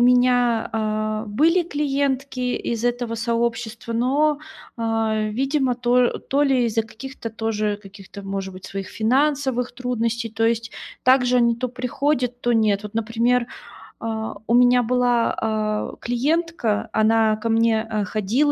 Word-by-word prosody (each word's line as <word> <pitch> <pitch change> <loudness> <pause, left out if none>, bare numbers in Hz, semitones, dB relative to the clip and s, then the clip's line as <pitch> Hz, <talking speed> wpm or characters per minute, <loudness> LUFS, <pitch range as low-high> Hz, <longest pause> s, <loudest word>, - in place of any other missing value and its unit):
меня, 245 -2 +3
а, 215 0 -1
были 320 - +3
клиентки 280 -4 -1 0.2
из 235 0 -3
этого 245 -1 -1
сообщества, 230 0 -2
но, 280 +6 +2 0.4
а, 225 -1 0
видимо, 265 +2 0
то 245 0 +2
то 280 +2 0
ли 265 -4 +3
из-за 225 -1 +1
каких-то 230 +1 -8
тоже, 215 -2 -1
каких-то, 195 0 -11
может 195 -1 -4
быть, 185 0 -11
своих 195 -1 -5
финансовых 265 +1 +1
трудностей, 235 -2 -2
то 225 +1 -1
есть 230 0 -1 0.3
также 250 -1 +4
они 235 -1 +4
то 255 +1 -2
приходят, 250 0 -1
то 240 - +1
нет. 215 -3 +2
Вот, 210 - -8
например, 235 +2 +1 0.5
а, 220 -1 -4
у 230 - 0
меня 245 0 +5
была, 245 0 +2
а, 215 -1 -1
клиентка, 260 -2 0
она 220 0 +3
ко 225 - -4
мне, 225 -1 +3
а, 220 -2 -2
ходила, 215 +9 +1
235 Hz, 140 wpm, -22 LUFS, 220-250 Hz, 0.5 s, меня